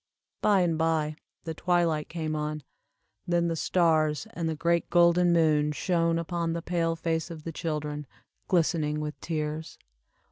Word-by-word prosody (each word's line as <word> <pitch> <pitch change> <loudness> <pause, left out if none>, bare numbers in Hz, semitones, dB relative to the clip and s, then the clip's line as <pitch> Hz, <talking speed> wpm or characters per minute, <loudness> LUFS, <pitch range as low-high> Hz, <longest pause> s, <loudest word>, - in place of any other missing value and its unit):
By 200 -3 +4
and 165 -3 +1
by 160 -2 +1 0.3
the 165 - -4
twilight 170 -2 +1
came 160 -2 -3
on, 150 0 -3 0.6
then 170 -1 +2
the 165 - -1
stars 160 -2 +2
and 165 -2 -2
the 160 - -2
great 170 +2 +1
golden 175 0 +5
moon 155 -3 +3
shone 165 +1 +1
upon 170 0 -2
the 170 0 -4
pale 165 -2 0
face 165 0 -2
of 160 -2 -8
the 165 - -5
children, 150 -2 -4 0.4
glistening 155 -4 +1
with 150 -1 -5
tears. 155 -1 -4
165 Hz, 150 wpm, -28 LUFS, 155-170 Hz, 0.6 s, golden